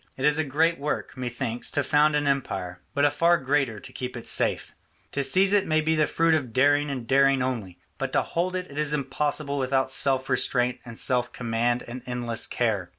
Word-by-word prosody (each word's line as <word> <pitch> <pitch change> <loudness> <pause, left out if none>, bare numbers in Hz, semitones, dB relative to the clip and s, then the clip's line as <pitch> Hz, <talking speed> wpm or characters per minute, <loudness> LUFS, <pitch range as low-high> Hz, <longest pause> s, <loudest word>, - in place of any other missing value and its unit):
It 130 - -1
is 150 +1 +4
a - - +2
great 160 +4 +1
work, 150 +1 -3
methinks, 120 -1 -4
to 145 - 0
found 150 +2 +3
an 145 0 0
empire, 95 -11 -2
but 140 +1 +3
a 145 - +3
far 170 +4 +3
greater 135 -6 0
to - - -11
keep 125 -1 -5
it 120 - -9
safe. - - +1 0.4
To 140 - -1
seize 190 +9 +3
it 205 -2 +3
may 155 0 +2
be 155 +1 +1
the 155 -1 +2
fruit 165 0 +2
of 140 -7 -1
daring 145 +2 +3
and 130 -4 -4
daring 135 +1 +3
only, 110 -9 -4 0.2
but - - -2
to - - +2
hold 180 +2 -2
it 180 -6 -5
is 150 0 +1
impossible 145 +1 -2
without 130 0 0
self 135 -1 +1
restraint 125 0 +1
and 115 -2 -10
self 125 -1 0
command 120 +1 -1
and 125 +2 -7
endless 120 -2 0
care. 105 -7 -1
135 Hz, 210 wpm, -25 LUFS, 125-150 Hz, 0.4 s, is